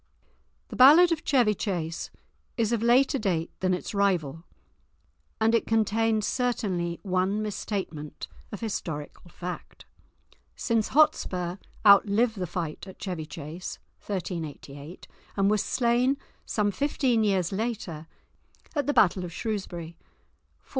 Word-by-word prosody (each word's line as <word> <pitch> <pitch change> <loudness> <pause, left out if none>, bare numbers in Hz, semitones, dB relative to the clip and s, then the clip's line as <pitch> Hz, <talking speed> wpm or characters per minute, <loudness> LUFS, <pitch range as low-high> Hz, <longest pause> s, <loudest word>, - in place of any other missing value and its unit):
The - - -7
ballad 310 +7 +8
of 330 -1 -1
Chevy 245 -9 +3
Chase 170 -5 -3 0.5
is 230 -2 +1
of 230 - 0
later 255 +4 +4
date 175 -6 -1
than 185 0 +1
its 180 - -6
rival, 170 -7 0 1.0
and 225 +1 +3
it 230 - +2
contains 225 0 +2
certainly 190 -9 -1
one 190 +1 0
misstatement 190 -7 -5 0.2
of - - -7
historical 170 -7 -5
fact, 180 +1 -8 0.7
since 230 -3 0
Hotspur 185 - +2 0.3
outlived 210 +3 +5
the 180 - -2
fight 165 +2 -5
at 190 - -11
Chevy 175 -6 -5
Chase 160 +3 -7 0.3
(1388) 160 -4 -6 0.3
and 195 +1 +3
was 210 -1 +2
slain 250 +4 +2 0.3
some 205 -1 +1
fifteen 255 0 +1
years 190 -4 +1
later 195 -7 -3 0.7
at 290 -4 -1
the 290 - +2
battle 185 -4 +4
of 175 - -6
Shrewsbury 175 -5 -5
(1403). - - -36
200 Hz, 125 wpm, -27 LUFS, 175-230 Hz, 1.0 s, ballad